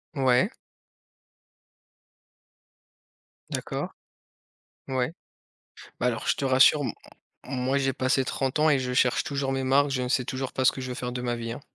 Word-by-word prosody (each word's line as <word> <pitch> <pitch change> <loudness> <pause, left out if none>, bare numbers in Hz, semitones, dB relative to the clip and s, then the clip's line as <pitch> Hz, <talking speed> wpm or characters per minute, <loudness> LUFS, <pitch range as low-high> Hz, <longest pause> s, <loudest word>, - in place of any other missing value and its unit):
Ouais. 130 -2 +3 3.0
D'accord. - - -3 1.0
Ouais. 130 +2 -1 0.9
Bah, 125 - +1
alors 115 -2 -2
je - - +3
te 140 - -3
rassure 135 +3 +5
m 135 - -1 0.6
m 135 - -6
moi, 130 +2 +1
j'ai 135 -1 0
passé 130 +1 +1
30 135 +2 -1
ans 155 +1 +4
et 140 -3 +4
je 125 -1 -2
cherche 125 +2 +2
toujours 140 -4 -2
mes 135 0 -1
marques, 140 +2 +4
je 130 -2 -1
ne 125 - -2
sais 125 -1 +1
toujours 130 0 -4
pas 130 - 0
ce - - +6
que 130 - -7
je 130 - -5
veux - - -3
faire 125 0 -4
de 125 - -4
ma 120 -1 -1
vie, 115 0 -4
hein! 125 - -7
130 Hz, 180 wpm, -26 LUFS, 125-135 Hz, 3.0 s, ce